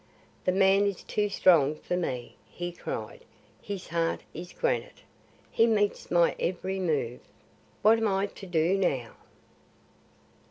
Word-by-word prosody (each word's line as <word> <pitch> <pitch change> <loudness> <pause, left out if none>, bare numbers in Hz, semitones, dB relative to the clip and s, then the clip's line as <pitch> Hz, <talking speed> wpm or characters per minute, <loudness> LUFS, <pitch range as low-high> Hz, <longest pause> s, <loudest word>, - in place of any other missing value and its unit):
"The 185 - +3
man 195 +1 +4
is 200 -3 -3
too 210 0 -1
strong 160 -7 +4
for 180 - -3
me," 130 -9 -3
he 175 0 -5
cried. 480 - -6 0.4
"His 200 -2 -6
heart 165 0 0
is 175 +2 -8
granite; - - -2 0.5
he 230 - +4
meets 205 -2 +1
my 170 -1 +3
every 190 +2 -2
move. 145 -9 -1 0.6
What 225 +1 +6
am 225 - +1
I 195 0 +1
to 195 -1 -10
do 175 +2 +2
now?" 130 -11 0
185 Hz, 135 wpm, -28 LUFS, 170-200 Hz, 0.6 s, What